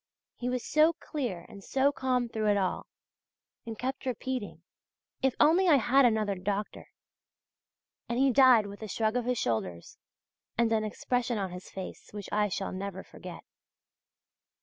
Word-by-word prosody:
He 245 - -3
was 250 -1 -2
so 310 +2 +4
clear 240 - -4
and 200 -3 -12
so 270 +5 +2
calm 255 -3 0
through 220 -2 -2
it 205 -1 +4
all, 190 -2 -1 0.8
and 225 -1 -5
kept 265 +1 -4
repeating: 255 -2 -4 0.6
"If 265 -1 +2
only 340 +5 +5
I 320 - +7
had 270 +1 +4
another 220 -3 +2
doctor!" 200 +2 -3 1.2
And 235 - -1
he 270 +1 +4
died 250 -4 +6
with 200 +1 -9
a 215 - -5
shrug 220 +2 0
of 245 -1 0
his 250 0 0
shoulders, 90 - -3 0.6
and 230 -1 +2
an 220 -1 +2
expression 240 +2 -1
on 195 -3 -2
his 180 +1 -9
face 190 -1 -8
which 205 -2 -7
I 210 0 +2
shall 195 +1 -3
never 190 0 -5
forget. - - -10
225 Hz, 160 wpm, -29 LUFS, 200-255 Hz, 1.2 s, I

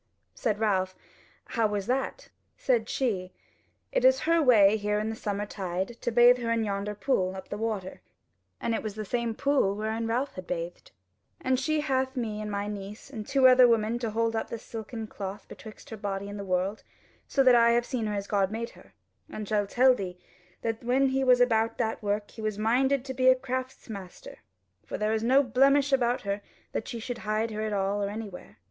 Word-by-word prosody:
Said 215 -3 -1
Ralph, 190 -4 +1 0.5
"How 225 -2 +1
was 205 -2 -2
that?" 260 +3 -2 0.3
Said 235 -4 +1
she: 190 -8 -1 0.6
"It - - +1
is - - +5
her 330 0 +3
way 215 -7 +6
here 210 -1 0
in 215 +1 -1
the - - -5
summer 205 -1 -3
tide 190 -1 -3
to 240 - -1
bathe 240 +2 +6
her 235 -1 -3
in 230 -1 +1
yonder 205 0 -2
pool 190 -6 0
up 190 - -9
the 205 - -4
water:" 215 -4 -3 0.6
(and 230 - -1
it - - -1
was 215 -2 -5
the 215 -1 -5
same 235 +1 -1
pool 275 -9 +2
wherein 220 +2 -2
Ralph 250 +5 -1
had 185 -1 -8
bathed) 175 - -5 0.5
"And 260 -1 +1
she 310 +3 0
hath 265 -2 0
me 215 -3 -2
and 210 - -4
my 200 0 -2
niece 210 +5 -7
and 215 -5 -6
two 270 -2 +5
other 255 -1 +7
women 230 0 +1
to 235 -2 -2
hold 225 +1 0
up 225 - -2
the 230 - -4
silken 225 0 -7
cloth 200 -1 -7
betwixt 220 +1 -12
her 220 - -5
body 200 -1 -4
and 205 0 -6
the - - -4
world; 190 +2 -1 0.5
so 270 - +2
that 255 -1 +7
I 235 -1 +6
have 240 0 +2
seen 240 -5 -2
her 210 - -2
as 200 -1 -3
God 200 -2 +1
made 230 +1 -4
her; - - -19 0.3
and 215 - -6
I - - -8
shall 205 -1 +1
tell 255 +5 +5
thee 185 -6 -5 0.5
that 225 0 -2
when 260 +3 +3
he 265 0 0
was 250 -1 +5
about 225 -2 +2
that 225 -2 -1
work 205 0 -2
he 225 - -10
was 215 -2 -2
minded 255 +5 +2
to 265 - -4
be 255 0 +1
a 260 - +8
craftsmaster; 255 -7 -6 0.4
for - - -5
there 215 +1 0
is 220 - 0
no 265 +4 +5
blemish 275 +3 +3
about 245 -2 +2
her 200 0 -3 0.3
that - - -3
she 235 - -5
should 240 +1 -5
hide 215 +2 -1
her 215 0 -4
at 215 0 -2
all 200 0 0
or 200 - -1
anywhere. 205 - -8
220 Hz, 215 wpm, -28 LUFS, 205-250 Hz, 0.6 s, a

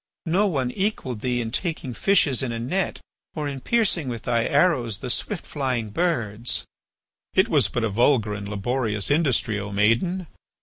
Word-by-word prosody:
No 185 +5 +2
one 135 -9 0
equalled 160 - -2
thee 125 +1 0
in 115 -1 -4
taking 155 -5 -2
fishes 180 -6 +3
in 130 -3 -2
a 115 - -3
net 140 +12 -1 0.4
or 150 -2 -2
in 140 -1 -4
piercing 195 - +1
with 120 -3 -4
thy 115 -1 +1
arrows 140 - +2
the 125 +4 -3
swift 200 - -2
flying 125 -7 -2
birds." 120 - -1 0.7
"It 190 +4 +4
was 140 - +4
but 120 +3 -2
a 115 - +1
vulgar 110 0 +2
and 100 0 -5
laborious 105 +1 -1
industry, 135 -8 +2
O 105 0 -5
maiden. 115 - +2
125 Hz, 170 wpm, -24 LUFS, 115-165 Hz, 0.7 s, It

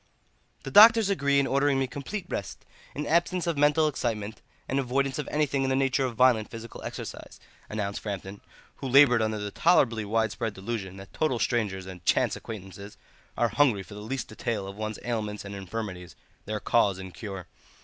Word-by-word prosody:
"The 135 - -6
doctors 220 +3 +8
agree 140 -6 +2
in 140 - +2
ordering 140 +1 +2
me 135 - +1
complete 145 +10 -6
rest, - - -5 0.3
an 150 - -3
absence 175 +2 +1
of 170 -2 0
mental 150 +2 +4
excitement, 110 -7 -3 0.3
and 135 - 0
avoidance 135 +1 0
of 150 - -3
anything 145 -2 0
in 135 - 0
the 130 - +2
nature 135 0 +1
of 125 -3 -4
violent 120 -3 +4
physical 115 0 -9
exercise," - - -8 0.3
announced 100 -2 -3
Framton, 100 -1 -5 0.4
who 135 - -5
laboured 130 -3 +6
under 110 0 0
the 105 -1 -4
tolerably 120 - +3
widespread 110 0 -1
delusion 95 -2 -5
that 95 0 -12
total 155 -6 0
strangers 105 -6 -1
and 95 -2 -10
chance - - +2
acquaintances 100 -1 -9 0.4
are 120 - +2
hungry 115 -5 +2
for 95 - -13
the 105 - -8
least 125 +5 -4
detail 110 -2 -3
of 100 - -8
one's 110 0 -4
ailments 105 -4 -3
and 100 - -7
infirmities, 95 -2 -6 0.3
their 105 +1 -3
cause 100 -3 +2
and 95 -1 -8
cure. 95 -5 -7
115 Hz, 180 wpm, -27 LUFS, 100-135 Hz, 0.4 s, doctors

